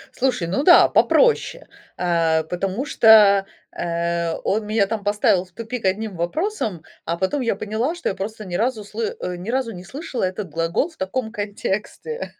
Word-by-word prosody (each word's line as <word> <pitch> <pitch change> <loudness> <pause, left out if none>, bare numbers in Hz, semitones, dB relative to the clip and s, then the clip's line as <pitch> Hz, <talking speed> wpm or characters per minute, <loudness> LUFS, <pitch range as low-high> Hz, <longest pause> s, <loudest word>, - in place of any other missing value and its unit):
Слушай, 250 -10 0
ну 190 +11 -1
да, 350 +2 +7
попроще, - - +2 0.3
э, 165 -2 +1
потому 190 - -3
что, 210 -6 +6 0.3
э, 170 0 -1
он 210 +1 -1
меня 215 -1 +2
там 210 0 -4
поставил 205 -3 +2
в 185 - -20
тупик 230 +2 -6
одним 200 +2 -1
вопросом, 200 - -2 0.2
а 170 +1 -2
потом 190 +11 -1
я 230 -5 0
поняла, 220 - -2
что 345 - -2
я 195 - -3
просто 215 +2 -6
ни 180 - -8
разу 225 +2 0
сл 205 - -10
э, 430 - -3
ни 180 +5 -7
разу 255 -1 -1
не 180 -1 -9
слышала 265 - -5
этот 185 0 -3
глагол 165 - 0
в 330 - -22
таком 220 +5 -3
контексте. 210 - -4
205 Hz, 175 wpm, -22 LUFS, 180-240 Hz, 0.3 s, да